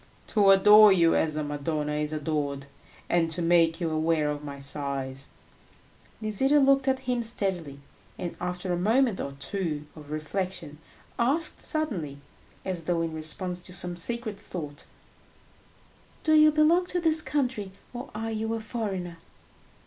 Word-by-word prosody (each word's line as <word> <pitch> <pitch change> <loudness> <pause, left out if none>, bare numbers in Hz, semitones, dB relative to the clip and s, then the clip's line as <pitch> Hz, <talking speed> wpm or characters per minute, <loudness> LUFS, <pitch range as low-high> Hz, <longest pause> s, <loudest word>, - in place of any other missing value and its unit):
"To 205 -3 +4
adore 210 +2 +8
you 170 -3 +4
as 155 -1 +1
a 155 - -2
Madonna 150 +1 -3
is 150 0 -2
adored, 145 -2 -2 0.4
and 170 -1 +1
to 165 +2 -2
make 165 -1 +3
you 165 -3 -1
aware 155 -1 +1
of 145 0 -6
my 140 -1 -7
sighs." 140 -1 -4 0.9
Nisida 265 +7 +2
looked 275 0 +3
at 265 0 +1
him 250 -2 -1
steadily, 190 - -1 0.4
and, 175 - -5
after 180 0 -3
a - - 0
moment 225 +2 +2
or 140 - -5
two 150 +1 -2
of 150 -2 -12
reflection, 155 0 -4 0.4
asked 285 +7 0
suddenly, 195 - 0 0.5
as 180 -4 -4
though 170 -1 0
in 165 -1 -3
response 175 +3 -4
to 180 - -8
some 175 -1 -3
secret 215 +3 0
thought, 150 -8 -7 1.4
"Do 315 - +3
you 305 0 +7
belong 320 +4 +3
to 360 - -1
this 320 -2 +3
country, 260 -8 -2 0.2
or 245 +1 -7
are 225 +1 -3
you 220 +1 -2
a - - -3
foreigner?" 195 -7 -4
180 Hz, 150 wpm, -27 LUFS, 155-225 Hz, 1.4 s, adore